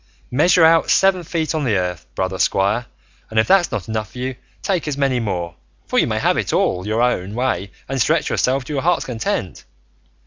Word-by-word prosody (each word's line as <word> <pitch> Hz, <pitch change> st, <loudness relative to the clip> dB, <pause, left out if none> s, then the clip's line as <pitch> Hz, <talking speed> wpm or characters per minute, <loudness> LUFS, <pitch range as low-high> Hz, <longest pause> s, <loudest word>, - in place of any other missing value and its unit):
Measure 165 Hz, +6 st, +4 dB
out 165 Hz, 0 st, +4 dB
seven 190 Hz, -1 st, +4 dB
feet 160 Hz, -1 st, -2 dB
on 155 Hz, -2 st, -1 dB
the 115 Hz, -6 st, +1 dB
earth, 90 Hz, -6 st, -2 dB
brother 95 Hz, +3 st, -2 dB
squire, 100 Hz, +5 st, +1 dB, 0.4 s
and 110 Hz, -, -6 dB
if 110 Hz, -, +2 dB
that's 190 Hz, -2 st, +4 dB
not 95 Hz, -, -4 dB
enough 110 Hz, -1 st, -4 dB
for -, -, -11 dB
you, 130 Hz, +1 st, -3 dB, 0.3 s
take 180 Hz, -5 st, -1 dB
as 145 Hz, -2 st, -2 dB
many 135 Hz, -3 st, +1 dB
more, 90 Hz, -6 st, -3 dB, 0.3 s
for -, -, +1 dB
you -, -, +2 dB
may -, -, -1 dB
have -, -, +1 dB
it -, -, -1 dB
all 90 Hz, +2 st, 0 dB
your 110 Hz, +3 st, +1 dB
own 105 Hz, -5 st, -1 dB
way 105 Hz, -7 st, -1 dB, 0.2 s
and 135 Hz, -1 st, -1 dB
stretch 160 Hz, +6 st, +2 dB
yourself 130 Hz, +1 st, +1 dB
to 150 Hz, -, -7 dB
your 135 Hz, -, -1 dB
heart's 175 Hz, +4 st, +1 dB
content. 110 Hz, -7 st, -3 dB
125 Hz, 210 wpm, -20 LUFS, 100-155 Hz, 0.4 s, Measure